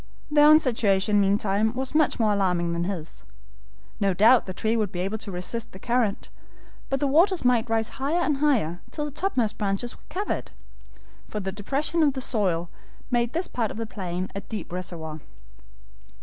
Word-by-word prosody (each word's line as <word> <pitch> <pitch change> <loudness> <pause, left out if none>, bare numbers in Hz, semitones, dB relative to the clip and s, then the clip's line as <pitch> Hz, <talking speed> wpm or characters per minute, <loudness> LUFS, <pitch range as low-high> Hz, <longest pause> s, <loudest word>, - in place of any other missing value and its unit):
Their 295 0 +6
own 305 0 +9
situation 210 -7 +2
meantime 205 +3 +1
was 265 +2 -2
much 305 -4 +2
more 215 -2 +3
alarming 180 -4 +1
than 170 0 -1
his. 165 - -6 0.8
No 195 -3 +1
doubt 225 +5 +5
the - - -3
tree 220 +4 0
would 215 -4 0
be 180 -3 -3
able 200 +4 -2
to 205 - -7
resist 180 +6 -3
the - - -9
current, 235 -2 0 0.6
but 270 - 0
the 290 - +1
waters 335 +3 +3
might 240 -2 +3
rise 225 -1 +1
higher 310 +6 +1
and 295 -4 +1
higher, 235 - +1
till 295 - -3
the 295 - -5
topmost 260 - -1
branches 205 +3 -1
were - - -21
covered, 400 +3 -3 0.8
for 210 - -4
the 190 -1 -3
depression 275 - -1
of 290 -3 +4
the 265 - -4
soil 180 -9 -1 0.4
made 240 -1 +1
this 340 +3 0
part 230 -3 -2
of - - -7
the 225 - -3
plain 185 -3 -4
a 200 - -4
deep 210 -5 -7
reservoir. 165 -3 -5
220 Hz, 185 wpm, -25 LUFS, 190-265 Hz, 0.8 s, own